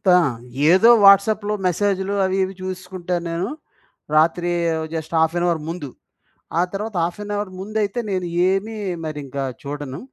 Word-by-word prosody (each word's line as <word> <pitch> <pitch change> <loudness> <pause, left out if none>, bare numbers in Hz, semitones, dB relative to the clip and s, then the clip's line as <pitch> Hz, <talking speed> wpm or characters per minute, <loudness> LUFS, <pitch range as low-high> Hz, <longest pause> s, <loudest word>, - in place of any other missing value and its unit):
ఆ! - - +7 0.5
ఏదో 190 +6 +6
వాట్సాప్‌లో 205 +2 +5
మెసేజ్‌లు 195 +1 0
అవి 190 0 0
ఇవి 190 +1 -3
చూసుకుంటాను 185 -1 -4
నేను. 170 +3 -2 0.7
రాత్రి 170 +3 +3 0.4
జస్ట్ 160 0 -5
హాఫ్ 160 +1 +2
ఏన్ 175 - +1
అవర్ 170 -3 0
ముందు. 165 -5 -5 0.7
ఆ - - +5
తర్వాత 210 +1 -4
హాఫ్ 170 +3 -3
ఏన్ 205 0 -4
అవర్ 205 -2 -3
ముందైతే 210 +3 -2
నేను 185 -2 -1 0.2
ఏమి 205 +4 -1 0.3
మరి 155 -1 -4
ఇంకా 135 +1 -4 0.2
చూడను. 145 -1 -5
185 Hz, 150 wpm, -21 LUFS, 165-200 Hz, 0.7 s, ఆ